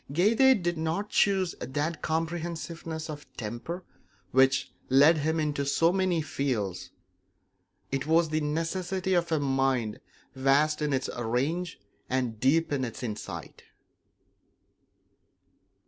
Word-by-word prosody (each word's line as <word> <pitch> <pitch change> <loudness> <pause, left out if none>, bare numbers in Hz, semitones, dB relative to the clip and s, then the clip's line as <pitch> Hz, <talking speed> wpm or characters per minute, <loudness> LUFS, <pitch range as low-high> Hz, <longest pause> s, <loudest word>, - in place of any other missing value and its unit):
Goethe 215 - +4
did 175 -1 -1
not 165 +6 -1
choose 190 -3 +2
that 145 +5 -3
comprehensiveness 165 0 -3
of 150 -2 -9
temper 120 - -5 0.5
which 135 +1 +3 0.2
led 145 +5 +6
him 160 +2 0
into 150 -2 0
so 165 +5 +2
many 185 -4 +1
fields; 110 - -2 1.0
it 135 +1 -2
was 165 0 +3
the 155 0 0
necessity 175 +5 -1
of 170 -1 +1
a 160 - +2
mind 135 -5 0 0.3
vast 140 +4 +2
in 150 -1 0
its 130 -1 0
range 135 +10 -1 0.3
and 125 -4 -1
deep 150 +5 +2
in 135 -2 0
its 120 0 -5
insight. 110 -3 -6
155 Hz, 115 wpm, -28 LUFS, 135-170 Hz, 1.0 s, led